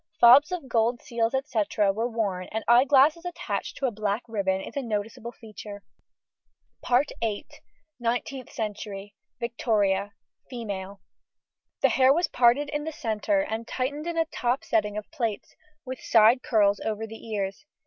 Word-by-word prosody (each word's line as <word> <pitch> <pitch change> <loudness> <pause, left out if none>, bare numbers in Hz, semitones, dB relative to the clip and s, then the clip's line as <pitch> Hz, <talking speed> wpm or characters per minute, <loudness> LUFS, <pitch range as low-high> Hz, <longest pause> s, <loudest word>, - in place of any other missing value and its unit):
Fobs 265 +8 +8
of 350 -7 -4
gold 235 0 +1
seals, 235 +1 -1
&c., 230 -8 0
were 210 +3 +2
worn, 200 -6 -2
and 220 0 -3
eye 240 +2 +6
glasses 290 +4 +4
attached 355 -1 -4
to 275 - -1
a 255 - +1
black 210 +1 -2
ribbon 195 -4 0
is - - -9
a 280 - -1
noticeable 225 0 -4
feature. 210 -3 -10 2.2
NINETEENTH 245 +2 -3
CENTURY. 205 -2 -5 0.3
VICTORIA. 205 -4 0 0.4
FEMALE. 200 -5 -6 0.8
The - - +6
hair 260 0 +5
was 340 +5 +3
parted 255 +3 +3
in 295 0 -2
the 320 - -4
centre 275 +2 0
and 230 -6 -4
tightened 285 +5 -3
in 340 -1 -3
a 325 - +3
top 255 -4 -1
setting 210 -1 0
of 210 - -7
plaits, 230 -10 -3 0.3
with 260 0 -6
side 230 +3 +5
curls 205 -5 +2
over 220 0 -3
the 225 0 -11
ears. 200 +2 -3
230 Hz, 150 wpm, -26 LUFS, 210-260 Hz, 2.2 s, Fobs